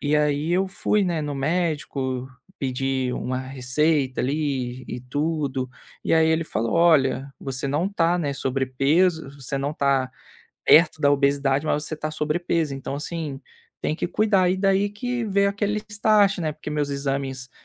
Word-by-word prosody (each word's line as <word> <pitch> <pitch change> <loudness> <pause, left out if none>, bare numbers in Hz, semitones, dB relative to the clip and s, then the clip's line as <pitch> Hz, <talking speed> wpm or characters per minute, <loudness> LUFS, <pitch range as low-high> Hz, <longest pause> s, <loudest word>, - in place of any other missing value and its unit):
E, 145 +1 +1
aí, 150 +2 +1
eu 190 +1 +2
fui, 210 +2 +1
né, 170 -3 -1
no 145 -1 -3
médico 140 -4 -1 0.3
pedir 130 -1 -1
uma 130 0 -3
receita 130 +2 0
ali 130 -3 -2
e 120 - -5
tudo 140 0 -2 0.4
e, - - +2
aí, 160 0 +4
ele 160 0 +2
falou: 115 -5 -2
"Olha, 140 -5 +3
você 135 0 -3
não 150 +7 0
está, 175 -3 +1
né, 145 -5 -1
sobrepeso, 135 +5 +1
você 135 -1 -5
não 145 +2 -2
tá 135 -3 +1 0.6
perto 160 -1 +6
da 145 -1 +4
obesidade, 140 0 +2
mas 150 0 +1
você 155 - -4
tá 155 0 -4
sobrepeso 155 0 -1
então 135 0 -5
assim, 150 -2 -4 0.4
tem 155 - -1
que 175 - -2
cuidar" 195 -3 +2
e 185 - +1
daí 195 +1 +2
que 245 +4 -3
veio 200 0 +2
aquele 205 +1 -1 0.6
né, 155 -2 -1
porque 150 - -7
meus 145 -1 -1
exames 135 -2 -3
145 Hz, 160 wpm, -24 LUFS, 135-165 Hz, 0.6 s, perto